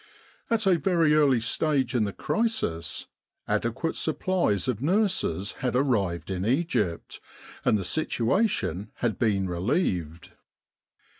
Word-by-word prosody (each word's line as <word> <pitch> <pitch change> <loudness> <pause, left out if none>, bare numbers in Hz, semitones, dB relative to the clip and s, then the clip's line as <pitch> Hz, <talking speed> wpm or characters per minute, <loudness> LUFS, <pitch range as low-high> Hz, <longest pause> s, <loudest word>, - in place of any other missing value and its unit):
At 225 -2 +1
a 180 -3 +4
very 165 -1 +3
early 145 -5 +4
stage 135 +1 0
in 115 -4 +2
the 100 - -3
crisis 100 - -2 0.4
adequate 120 +8 -1
supplies 160 - 0
of 120 -3 -1
nurses 160 - +1
had 125 -2 -1
arrived 100 -10 0
in 95 -1 -2
Egypt, 115 - -1 0.4
and 110 - +3
the 100 - -3
situation 115 - 0
had 120 -3 -2
been 100 -4 +1
relieved. 90 - -1
120 Hz, 120 wpm, -26 LUFS, 95-165 Hz, 0.4 s, a